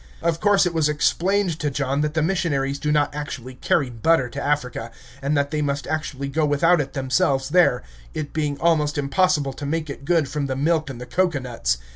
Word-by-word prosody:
Of 165 Hz, -1 st, +1 dB
course 205 Hz, -1 st, +4 dB
it 175 Hz, -, -1 dB
was 160 Hz, -2 st, +2 dB
explained 175 Hz, +3 st, +1 dB
to 150 Hz, -, 0 dB
John 140 Hz, 0 st, -1 dB
that 150 Hz, +1 st, -1 dB
the 160 Hz, -, +2 dB
missionaries 140 Hz, -6 st, 0 dB
do 150 Hz, +2 st, -1 dB
not 150 Hz, -1 st, +2 dB
actually 140 Hz, -4 st, -6 dB
carry 130 Hz, +1 st, 0 dB
butter 130 Hz, +3 st, +2 dB
to 140 Hz, -, -6 dB
Africa, 125 Hz, -5 st, -1 dB, 0.3 s
and 140 Hz, +2 st, 0 dB
that 140 Hz, 0 st, 0 dB
they 155 Hz, -1 st, -1 dB
must 140 Hz, -2 st, -1 dB
usually 145 Hz, -3 st, -3 dB
go 155 Hz, +3 st, 0 dB
without 150 Hz, +3 st, +3 dB
it 135 Hz, -1 st, -6 dB
themselves 135 Hz, 0 st, +1 dB
there, 170 Hz, -7 st, +3 dB, 0.3 s
it 145 Hz, -2 st, -4 dB
being 150 Hz, -2 st, -1 dB
almost 150 Hz, -3 st, +2 dB
impossible 145 Hz, 0 st, +1 dB
to 145 Hz, -, -9 dB
make 155 Hz, 0 st, -2 dB
it 140 Hz, -, -9 dB
good 160 Hz, -1 st, +2 dB
from 140 Hz, +1 st, -2 dB
the 130 Hz, -, -2 dB
milk 155 Hz, +2 st, +1 dB
in 130 Hz, -, -6 dB
the 125 Hz, -, -7 dB
cocoanuts. 130 Hz, -, 0 dB
145 Hz, 205 wpm, -23 LUFS, 135-160 Hz, 0.3 s, course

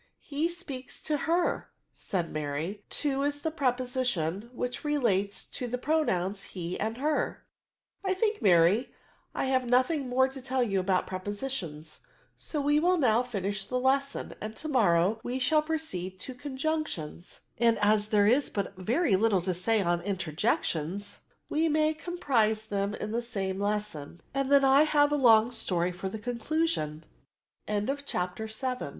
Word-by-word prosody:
" -, -, -46 dB, 0.2 s
He 310 Hz, +4 st, +1 dB
speaks 290 Hz, -7 st, -6 dB
to 305 Hz, -, 0 dB
her," 345 Hz, +1 st, +1 dB, 0.2 s
said 175 Hz, -4 st, -3 dB
Mary: 155 Hz, +7 st, -3 dB
to 275 Hz, -2 st, 0 dB
is 290 Hz, +1 st, -1 dB
the 320 Hz, -, -1 dB
preposition 250 Hz, -, -1 dB
which 245 Hz, 0 st, -4 dB
relates 210 Hz, -10 st, 0 dB
to 250 Hz, -, -5 dB
the 245 Hz, +1 st, -2 dB
pro 315 Hz, +5 st, +2 dB
nouns 190 Hz, -3 st, -1 dB
he 175 Hz, -1 st, -4 dB
and 220 Hz, +2 st, -2 dB
her.".. 300 Hz, +3 st, -1 dB, 0.3 s
'« -, -, -52 dB
I 380 Hz, -1 st, +1 dB
think, 425 Hz, 0 st, 0 dB
Mary, 190 Hz, +4 st, +4 dB, 0.4 s
I -, -, 0 dB
have 260 Hz, -2 st, +1 dB
nothing 255 Hz, +2 st, +2 dB
more 260 Hz, +1 st, +4 dB
to 265 Hz, 0 st, -9 dB
tell 260 Hz, 0 st, 0 dB
you 195 Hz, -5 st, 0 dB
about 185 Hz, 0 st, +1 dB
prepositions: 185 Hz, -, -5 dB, 0.2 s
' -, -, -34 dB
so 305 Hz, -, -4 dB
we 290 Hz, +1 st, +3 dB
will 360 Hz, +3 st, +3 dB
now 240 Hz, -6 st, +4 dB
finish 205 Hz, -5 st, -3 dB
the 250 Hz, -, -1 dB
lesson, 275 Hz, +2 st, 0 dB
and 215 Hz, +1 st, -5 dB
to 310 Hz, -, -6 dB
morrow 210 Hz, -, +3 dB
we 245 Hz, +1 st, -2 dB
shall 300 Hz, +4 st, +3 dB
proceed 300 Hz, -, -4 dB
to 260 Hz, -, -6 dB
conjunctions; 265 Hz, -, -4 dB, 0.2 s
and 230 Hz, -1 st, +4 dB
as 210 Hz, 0 st, +3 dB
there 210 Hz, -1 st, +3 dB
is 255 Hz, +7 st, +3 dB
but 200 Hz, -1 st, -3 dB
very 225 Hz, -, +2 dB
little 200 Hz, -1 st, +3 dB
to 185 Hz, 0 st, 0 dB
say 205 Hz, +4 st, +1 dB
on 175 Hz, -1 st, +1 dB
interjections, 185 Hz, 0 st, -2 dB, 0.3 s
we 320 Hz, +2 st, +1 dB
may 310 Hz, +1 st, +3 dB
comprise 250 Hz, -11 st, 0 dB
them 200 Hz, -1 st, -1 dB
in 215 Hz, -, -4 dB
the 235 Hz, +2 st, 0 dB
same 195 Hz, -5 st, -3 dB
lesson; 200 Hz, -7 st, -3 dB
and 275 Hz, 0 st, -1 dB
the 280 Hz, -1 st, +7 dB
235 Hz, 145 wpm, -29 LUFS, 195-280 Hz, 0.4 s, the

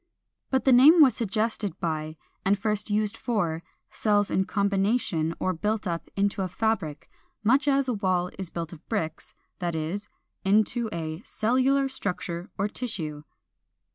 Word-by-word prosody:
But 265 Hz, -1 st, +1 dB
the 265 Hz, -, +6 dB
name 290 Hz, +8 st, +8 dB
was 265 Hz, -7 st, +7 dB
suggested 215 Hz, -4 st, -1 dB
by, 155 Hz, -2 st, -3 dB, 0.3 s
and 200 Hz, +2 st, +3 dB
first 210 Hz, 0 st, -1 dB
used 210 Hz, +1 st, 0 dB
only -, -, -23 dB
for, 170 Hz, -8 st, 0 dB, 0.3 s
cells 205 Hz, -2 st, +1 dB
in 190 Hz, -, +2 dB
combination 195 Hz, -5 st, +1 dB
or 185 Hz, -, 0 dB
built 210 Hz, +5 st, -1 dB
up 170 Hz, -2 st, -3 dB
into 200 Hz, 0 st, +1 dB
a 190 Hz, -, 0 dB
fabric, 185 Hz, -7 st, -2 dB, 0.4 s
much 265 Hz, +6 st, +3 dB
as 275 Hz, -1 st, +3 dB
a 250 Hz, -, +1 dB
wall 185 Hz, -4 st, 0 dB
is 190 Hz, -3 st, -3 dB
built 170 Hz, 0 st, -5 dB
of 165 Hz, 0 st, -14 dB
bricks, 165 Hz, -8 st, -3 dB, 0.2 s
that 175 Hz, -2 st, -2 dB
is, 165 Hz, +6 st, -3 dB, 0.3 s
into 220 Hz, +4 st, +2 dB
a 160 Hz, -5 st, -4 dB
401. -, -, -16 dB
=Cellular 260 Hz, +4 st, +2 dB
Structure 180 Hz, -7 st, -4 dB
or 200 Hz, -, +1 dB
Tissue. 160 Hz, -11 st, -4 dB
200 Hz, 160 wpm, -27 LUFS, 170-225 Hz, 0.4 s, name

